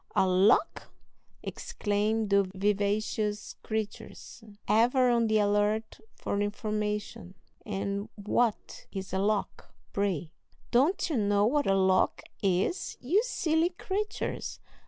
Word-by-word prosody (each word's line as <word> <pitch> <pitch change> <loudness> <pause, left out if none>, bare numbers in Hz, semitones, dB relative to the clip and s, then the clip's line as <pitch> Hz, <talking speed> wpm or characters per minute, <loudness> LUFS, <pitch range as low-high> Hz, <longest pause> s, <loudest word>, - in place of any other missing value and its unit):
"A - - +4
lock!" 190 - +3 0.5
exclaim 210 +1 -1
the 200 0 +5
vivacious 210 +1 0
creatures, 220 +1 -5 0.2
ever 245 +3 +4
on 235 -1 +3
the 215 0 +3
alert 210 +1 +1 0.2
for 200 - -2
information; 210 -2 -3 0.3
"and 200 +1 -3
what 215 +2 -1
is 190 -2 -6
a 190 - +1
lock, 205 +1 -2 0.2
pray?" 185 -6 -1 0.4
"Don't 280 +10 +3
you 310 -6 -1
know 205 -1 +3
what 285 +5 +1
a 195 - +4
lock 190 -1 +2 0.2
is, 195 - 0
you 345 - +2
silly 330 -8 +1
creatures. 400 +3 -4
210 Hz, 115 wpm, -29 LUFS, 200-235 Hz, 0.5 s, the